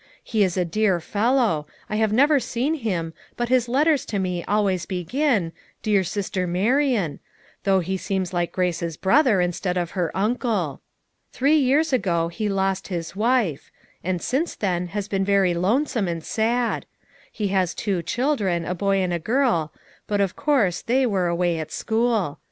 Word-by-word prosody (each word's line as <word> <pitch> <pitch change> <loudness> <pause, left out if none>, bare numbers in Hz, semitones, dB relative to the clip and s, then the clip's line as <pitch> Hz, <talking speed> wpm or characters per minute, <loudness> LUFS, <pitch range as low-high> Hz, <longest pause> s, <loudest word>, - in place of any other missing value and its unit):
He 220 -3 +1
is 185 -1 0
a 180 - +2
dear 195 +1 +1
fellow; 210 - +1 0.2
I 215 - -2
have 220 -1 +2
never 285 +6 +4
seen 255 +4 -1
him, 185 - -2 0.2
but 240 0 -1
his 250 -2 +2
letters 290 +3 +3
to 210 - -2
me 180 -2 -2
always 195 -3 0
begin, 190 - 0 0.3
'Dear 205 -3 +3
sister 185 0 -2
Marian/ 210 - +1 0.5
though 190 -1 +3
he 190 +3 -2
seems 190 -2 -2
like 175 -1 0
Grace's 170 -3 -1
brother, 235 0 +4
instead 180 +1 -1
of 175 -2 -2
her 175 -4 -1
uncle. 210 - -1 0.5
Three 290 +4 +3
years 285 +3 +2
ago 170 -9 +1
he 210 +5 -3
lost 195 -1 0
his 170 -2 -5
wife; 220 - +1 0.3
and 180 -1 -2
since 290 +7 -1
then 180 -3 -1
has 205 +2 -4
been 195 -2 0
very 195 -2 +3
lonesome 215 - +1
and 165 -2 -3
sad; 235 +2 0 0.4
he 210 -2 -2
has 185 -2 +1
two 195 -5 -1
children, 205 - 0
a 180 - -2
boy 195 +2 0
and 180 -1 -1
a 170 - -1
girl, 220 - +1 0.4
but 205 -1 0
of 195 -2 0
course 225 - +1
they 255 +3 +2
were 195 -6 +1
away 170 -1 0
at 155 - -6
school. 220 -8 0
195 Hz, 170 wpm, -23 LUFS, 175-240 Hz, 0.5 s, never